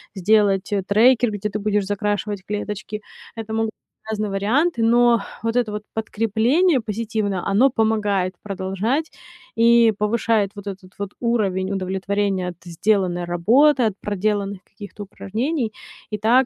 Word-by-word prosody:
сделать, 200 Hz, 0 st, +2 dB
э, 200 Hz, -2 st, 0 dB
трекер, 235 Hz, +4 st, +4 dB
где 210 Hz, 0 st, -3 dB
ты 205 Hz, -, -3 dB
будешь 205 Hz, -1 st, 0 dB
закрашивать 205 Hz, 0 st, -2 dB
клеточки. 210 Hz, +1 st, -4 dB, 0.3 s
Это 220 Hz, -1 st, -6 dB
могут 225 Hz, 0 st, 0 dB, 0.4 s
разные 215 Hz, -1 st, -2 dB
варианты, 230 Hz, -, +1 dB
но 235 Hz, 0 st, +4 dB, 0.2 s
вот 230 Hz, +1 st, 0 dB
это 240 Hz, -3 st, +1 dB
вот 210 Hz, -, -4 dB
подкрепление 230 Hz, -, +2 dB
позитивное- 215 Hz, -3 st, -2 dB
оно 210 Hz, +8 st, +4 dB
помогает 210 Hz, -6 st, 0 dB
продолжать 200 Hz, -, -2 dB, 0.5 s
и 230 Hz, 0 st, +6 dB
повышает 210 Hz, -1 st, +1 dB
вот 205 Hz, -1 st, -9 dB
этот 190 Hz, -1 st, -8 dB
вот 200 Hz, -, -3 dB
уровень 200 Hz, -6 st, 0 dB
удовлетворения 195 Hz, 0 st, -1 dB
от 175 Hz, -, -9 dB
сделанной 175 Hz, 0 st, 0 dB
работы, 240 Hz, -, +4 dB
от 215 Hz, -4 st, +1 dB
проделанных 200 Hz, -1 st, -2 dB
каких-то 205 Hz, 0 st, -10 dB
упражнений. 220 Hz, -, -3 dB, 0.4 s
И 210 Hz, -, -3 dB
так 240 Hz, +5 st, +4 dB
210 Hz, 135 wpm, -22 LUFS, 195-230 Hz, 0.5 s, и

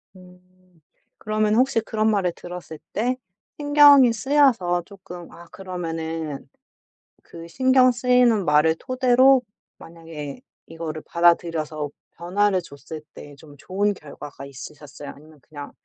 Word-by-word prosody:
음 180 Hz, -1 st, -17 dB, 0.8 s
그러면 215 Hz, 0 st, 0 dB
혹시 255 Hz, -1 st, +2 dB
그런 220 Hz, 0 st, -1 dB
말을 185 Hz, -4 st, 0 dB
들었을 175 Hz, -2 st, -9 dB, 0.2 s
때 250 Hz, +4 st, -1 dB, 0.4 s
신경이 290 Hz, -4 st, +6 dB
쓰여서 230 Hz, -9 st, +2 dB
조금 180 Hz, -3 st, -12 dB
아 170 Hz, -, -14 dB
그러면은 165 Hz, -5 st, -5 dB, 0.8 s
그 165 Hz, 0 st, -11 dB
신경 260 Hz, +5 st, +3 dB
쓰이는 245 Hz, -4 st, +2 dB
말을 150 Hz, +1 st, +3 dB
토대로 255 Hz, 0 st, +4 dB, 0.4 s
만약에 165 Hz, -, -10 dB, 0.3 s
이거를 160 Hz, -1 st, -6 dB
받아들여서 165 Hz, -3 st, +1 dB, 0.3 s
변화를 190 Hz, +2 st, 0 dB
줬을 150 Hz, 0 st, -10 dB
때 145 Hz, -1 st, -12 dB
좀 145 Hz, 0 st, -16 dB
좋은 200 Hz, +7 st, -1 dB
결과가 145 Hz, -3 st, -11 dB
있으셨어요? 145 Hz, +1 st, -11 dB
아니면 155 Hz, +1 st, -15 dB
그냥 145 Hz, +1 st, -10 dB
175 Hz, 270 characters per minute, -23 LUFS, 155-230 Hz, 0.8 s, 신경이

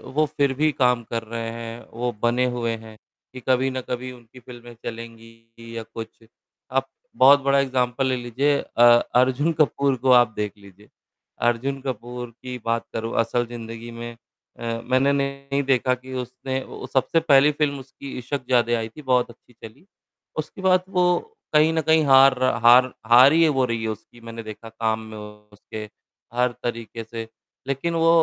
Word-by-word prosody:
वो 155 Hz, +1 st, +3 dB
फिर 140 Hz, -2 st, +2 dB
भी 155 Hz, +3 st, +1 dB
काम 125 Hz, -3 st, +2 dB
कर 115 Hz, 0 st, -4 dB
रहे 115 Hz, 0 st, -5 dB
है, 115 Hz, 0 st, -8 dB
वो 120 Hz, +2 st, -2 dB
बने 120 Hz, +2 st, +2 dB
हुए 115 Hz, -1 st, -1 dB
है 110 Hz, -1 st, -12 dB, 0.4 s
कि 130 Hz, -, -8 dB
कभी 130 Hz, +1 st, +3 dB
ना 130 Hz, 0 st, -4 dB
कभी 125 Hz, +1 st, -4 dB
उनकी 120 Hz, 0 st, -15 dB
फ़िल्में 120 Hz, -1 st, -12 dB
चलेंगी 115 Hz, 0 st, -10 dB
या 115 Hz, -, -4 dB
कुछ 115 Hz, 0 st, -10 dB, 0.5 s
आप 135 Hz, +1 st, 0 dB, 0.3 s
बहुत 140 Hz, +2 st, +7 dB
बड़ा 140 Hz, 0 st, +3 dB
एग्ज़ाम्पल 130 Hz, -1 st, 0 dB
ले 130 Hz, -, +1 dB
लीजिए 125 Hz, +4 st, 0 dB
अ, -, -, -4 dB, 0.3 s
अर्जुन 130 Hz, +6 st, +3 dB
कपूर 140 Hz, -2 st, +2 dB
को 130 Hz, -, +4 dB
आप 120 Hz, -3 st, +5 dB
देख 105 Hz, -1 st, -2 dB
लीजिये। 100 Hz, +1 st, -18 dB, 0.6 s
अर्जुन 130 Hz, +4 st, 0 dB
कपूर 125 Hz, -1 st, -5 dB
की 125 Hz, -1 st, -6 dB
बात 115 Hz, 0 st, -1 dB
करूँ, 115 Hz, 0 st, -4 dB
असल 120 Hz, +1 st, +1 dB
जिंदगी 115 Hz, 0 st, -8 dB
में 120 Hz, 0 st, -7 dB, 0.5 s
अ, 115 Hz, -1 st, -3 dB
मैंने 130 Hz, +2 st, +3 dB
नहीं 140 Hz, 0 st, -1 dB
देखा 130 Hz, -1 st, +2 dB
कि 130 Hz, +1 st, -11 dB
उसने 130 Hz, +1 st, -4 dB
ओ -, -, -9 dB
सबसे 135 Hz, +5 st, +2 dB
पहली 150 Hz, -2 st, +5 dB
फ़िल्म 145 Hz, -1 st, -1 dB
उसकी 135 Hz, +1 st, -10 dB
इशकजादे 125 Hz, -2 st, 0 dB
आई 115 Hz, -1 st, -3 dB
थी 150 Hz, -, -12 dB
बहुत 125 Hz, -3 st, +1 dB
अच्छी 120 Hz, +1 st, -18 dB
चली। 115 Hz, -, -14 dB, 0.5 s
उसके 155 Hz, +5 st, -5 dB
बाद 185 Hz, -1 st, +3 dB
वो 180 Hz, -2 st, +1 dB, 0.5 s
कहीं 155 Hz, +1 st, +5 dB
न 160 Hz, -, +1 dB
कहीं 160 Hz, +1 st, +3 dB
हार 135 Hz, 0 st, +7 dB
रहा 130 Hz, -2 st, +1 dB
हार 125 Hz, +1 st, +7 dB, 0.2 s
हार 125 Hz, +4 st, +8 dB
ही 165 Hz, +1 st, +5 dB
है 160 Hz, -, +4 dB
वो 135 Hz, -3 st, +1 dB
रही 115 Hz, -2 st, -2 dB
हो -, -, -6 dB
रही -, -, -5 dB
है 110 Hz, -, -1 dB
उसकी 110 Hz, +2 st, -11 dB
मैंने 115 Hz, 0 st, -8 dB
देखा 110 Hz, +1 st, -9 dB
काम 110 Hz, 0 st, -1 dB
में 110 Hz, -, -8 dB
उसके, 105 Hz, 0 st, -10 dB, 0.5 s
हर 125 Hz, +1 st, +1 dB
तरीके 115 Hz, -1 st, -5 dB
से। 115 Hz, 0 st, -7 dB, 0.4 s
लेकिन 140 Hz, +5 st, -2 dB
वो 165 Hz, 0 st, +3 dB
125 Hz, 185 wpm, -23 LUFS, 115-135 Hz, 0.6 s, हार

